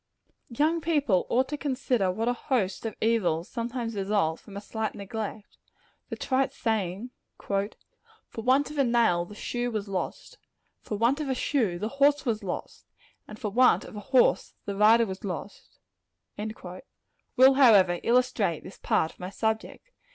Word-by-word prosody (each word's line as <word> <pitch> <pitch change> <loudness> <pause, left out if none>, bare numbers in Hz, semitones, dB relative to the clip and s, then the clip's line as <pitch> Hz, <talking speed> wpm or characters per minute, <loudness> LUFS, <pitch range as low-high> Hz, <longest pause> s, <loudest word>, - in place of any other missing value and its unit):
Young 310 +7 +1
people 290 - +1
ought 260 +2 +2
to 295 - -3
consider 250 -8 0
what 220 +5 -2
a 245 - +2
host 230 -5 -1
of 220 - -6
evils 190 -7 +1
sometimes 235 -1 -4
result 195 -5 0
from 200 -2 -11
a - - -3
slight 220 +2 -4
neglect. 210 +1 -6 0.5
The - - -4
trite 265 0 0
saying 215 +1 -2 0.3
"For 200 0 -1 0.7
want 260 +6 +2
of 300 - -5
a - - +5
nail, 235 -8 +2
the 210 - -12
shoe 245 +3 -3
was 215 -3 -3
lost; 195 - -5 0.4
for 210 - -4
want 240 +7 +2
of 290 - -3
a 260 - 0
shoe, 235 -10 0
the 210 - -3
horse 290 0 +4
was 225 -3 -1
lost; 185 - -6 0.4
and 215 - -10
for 210 -2 -4
want 250 +4 +4
of - - -11
a - - -5
horse, 250 +5 +2
the 200 - -4
rider 220 +3 +5
was 190 -2 -7
lost" 195 +1 -7 1.6
will, 260 +2 +7
however, 205 -10 +5
illustrate 230 -8 +1
this 190 - -12
part 160 - +1
of - - -24
my 180 - -5
subject. 220 - -3
225 Hz, 165 wpm, -27 LUFS, 200-255 Hz, 1.6 s, will